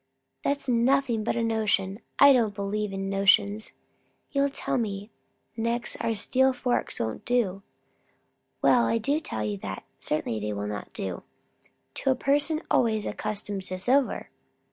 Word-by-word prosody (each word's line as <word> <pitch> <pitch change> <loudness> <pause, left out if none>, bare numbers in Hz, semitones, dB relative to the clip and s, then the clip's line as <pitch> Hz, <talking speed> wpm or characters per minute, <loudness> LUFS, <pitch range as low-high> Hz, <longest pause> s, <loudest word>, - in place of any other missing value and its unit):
"That's 280 0 -1
nothing 245 -1 +2
but 225 - 0
a 235 - 0
notion. 210 -3 0 0.2
I 280 0 +8
don't 225 -5 +2
believe 205 +1 -2
in 195 0 -3
notions. 200 +2 +3 0.6
You'll 280 0 +2
tell 270 - -1
me 205 -1 -4 0.4
next 235 +1 -1
our 230 -1 -1
steel 260 +5 +2
forks 250 -1 -1
won't 110 -1 -3
do." 210 -6 0 1.0
"Well, 240 -1 +5
I 230 - +2
do 280 +7 +1
tell 110 - -4
you 105 -1 -2
that. - - -6 0.2
Certainly 150 -7 -2
they 105 0 -3
will 100 0 -3
not 105 0 -5
do, 95 -2 -4 0.7
to - - -1
a 260 - +4
person 290 +4 +1
always 220 -3 +2
accustomed 205 -2 -3
to 185 0 -4
silver." 255 +8 +1
220 Hz, 150 wpm, -27 LUFS, 195-250 Hz, 1.0 s, I